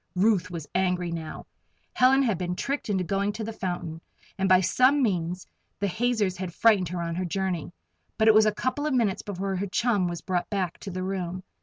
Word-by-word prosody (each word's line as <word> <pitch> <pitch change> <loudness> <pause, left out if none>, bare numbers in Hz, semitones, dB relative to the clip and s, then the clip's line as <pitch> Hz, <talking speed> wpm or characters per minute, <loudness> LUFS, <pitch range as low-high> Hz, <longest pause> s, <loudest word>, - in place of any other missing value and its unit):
Ruth 185 -1 +2
was 170 -4 -6
angry 180 -2 0
now. 160 -2 -6 0.5
Helen 265 +2 +5
had 220 -9 0
been 180 -1 -2
tricked 275 +4 -3
into 190 -3 +1
going 200 +3 0
to 220 - -5
the 225 +1 -5
fountain, 175 -5 -4 0.3
and 190 0 0
by 185 -1 +7
some 255 +9 +3
means 180 -4 -1 0.3
the 200 - 0
hazers 215 -1 0
had 180 -2 -5
frightened 205 -7 +4
her 175 -1 -3
on 170 0 -3
her 180 +2 -2
journey. 180 -2 -2 0.5
But 220 - +3
it 220 - +8
was 215 0 +6
a - - +4
couple 255 +7 -2
of 285 - 0
minutes 220 -6 +1
before 195 -1 -3
her 200 +2 -2
chum 200 -1 +1
was 175 -1 -4
brought 180 -2 -2
back 190 -5 -2
to 200 - -7
the 185 0 -4
room. 185 -1 -3
190 Hz, 210 wpm, -26 LUFS, 180-215 Hz, 0.5 s, it